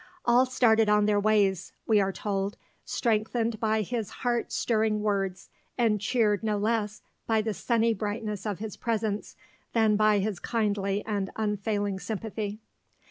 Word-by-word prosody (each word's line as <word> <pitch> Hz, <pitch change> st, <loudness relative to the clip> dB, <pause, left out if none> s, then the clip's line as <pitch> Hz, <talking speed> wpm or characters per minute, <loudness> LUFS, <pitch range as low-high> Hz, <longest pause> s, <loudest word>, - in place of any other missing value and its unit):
"All 245 Hz, +2 st, +5 dB
started 225 Hz, -4 st, +3 dB
on 210 Hz, 0 st, +4 dB
their 205 Hz, -1 st, +3 dB
ways," 200 Hz, -3 st, +2 dB
we 215 Hz, -2 st, +4 dB
are 195 Hz, 0 st, +1 dB
told, 195 Hz, 0 st, -2 dB, 0.3 s
"strengthened 225 Hz, 0 st, 0 dB
by 220 Hz, -1 st, +1 dB
his 225 Hz, 0 st, -3 dB, 0.2 s
heart 240 Hz, -1 st, 0 dB
stirring 215 Hz, -2 st, +1 dB
words, 195 Hz, -3 st, -2 dB, 0.3 s
and 220 Hz, -4 st, +2 dB
cheered 210 Hz, -2 st, +2 dB
no 215 Hz, -2 st, 0 dB
less 215 Hz, 0 st, -1 dB, 0.2 s
by 220 Hz, -1 st, +2 dB
the 220 Hz, -1 st, -1 dB
sunny 230 Hz, +1 st, +1 dB
brightness 210 Hz, 0 st, -4 dB
of 205 Hz, -3 st, -2 dB
his 215 Hz, -1 st, -6 dB
presence 220 Hz, -3 st, -2 dB, 0.4 s
than 220 Hz, -2 st, +4 dB
by 215 Hz, -1 st, +4 dB
his 200 Hz, -2 st, -1 dB
kindly 205 Hz, -3 st, -1 dB
and 200 Hz, -3 st, -2 dB
unfailing 205 Hz, -2 st, -1 dB
sympathy." 215 Hz, 0 st, -4 dB
215 Hz, 145 wpm, -28 LUFS, 205-225 Hz, 0.4 s, All